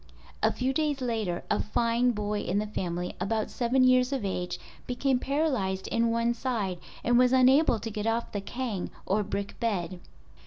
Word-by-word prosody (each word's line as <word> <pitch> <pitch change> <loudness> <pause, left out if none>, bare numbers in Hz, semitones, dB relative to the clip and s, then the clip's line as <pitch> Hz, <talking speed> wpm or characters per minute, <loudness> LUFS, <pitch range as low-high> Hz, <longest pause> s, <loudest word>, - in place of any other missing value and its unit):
A - - +4
few 260 +1 -1
days 295 -1 0
later 220 -8 -2
a 210 - +2
fine 235 +3 +1
boy 210 -2 -1
in 190 0 -1
the 210 - +1
family, 180 -4 -3
about 215 +3 -1
seven 255 +2 +2
years 255 0 +4
of 265 -7 -1
age, 180 -2 -3 0.3
became 250 +1 +1
paralyzed 260 -10 0
in 230 0 +2
one 230 +1 +1
side 220 -7 -2 0.2
and 240 0 +4
was 250 0 +5
unable 260 +1 +5
to 225 +1 -5
get 210 +1 -3
off 230 +1 0
the 205 - -3
kang 230 -3 -4 0.2
(or 205 +3 +1
brick 200 0 -4
bed). 185 -6 -1
230 Hz, 180 wpm, -28 LUFS, 200-255 Hz, 0.3 s, was